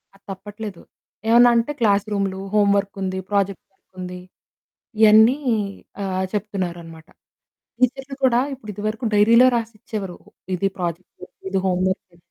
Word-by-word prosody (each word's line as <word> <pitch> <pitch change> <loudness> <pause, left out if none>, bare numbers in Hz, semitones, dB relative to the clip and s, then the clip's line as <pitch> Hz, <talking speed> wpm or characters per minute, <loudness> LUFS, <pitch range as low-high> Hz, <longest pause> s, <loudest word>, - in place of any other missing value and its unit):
అది 195 - -24
తప్పట్లేదు. 205 0 -8 0.5
ఏమన్నా 240 +1 +7
అంటే 235 +5 +1
క్లాసురూములు, 200 -3 +1
హోంవర్కుంది, 200 -2 +1
ప్రాజెక్ట్ 200 -2 0
వర్కుంది. 180 -1 -9 0.8
ఇవన్నీ 220 +4 +7 0.7
ఆహ్, 190 -1 -1
చెప్తున్నారన్నమాట. 175 -6 -4 0.7
టీచర్లు 265 +2 0
కూడా 245 -2 +4
ఇప్పుడు 235 -5 -11
ఇదివరకు 215 +4 -3
డైరీలో 230 +4 +6
రాసిచ్చేవారు. 215 -4 -6 0.4
ఇది 195 +2 0
ప్రాజెక్ట్, 175 +1 -5 0.2
ఇది 190 - 0
హోంవర్క్. 185 0 -1
200 Hz, 100 wpm, -22 LUFS, 185-220 Hz, 0.8 s, ఏమన్నా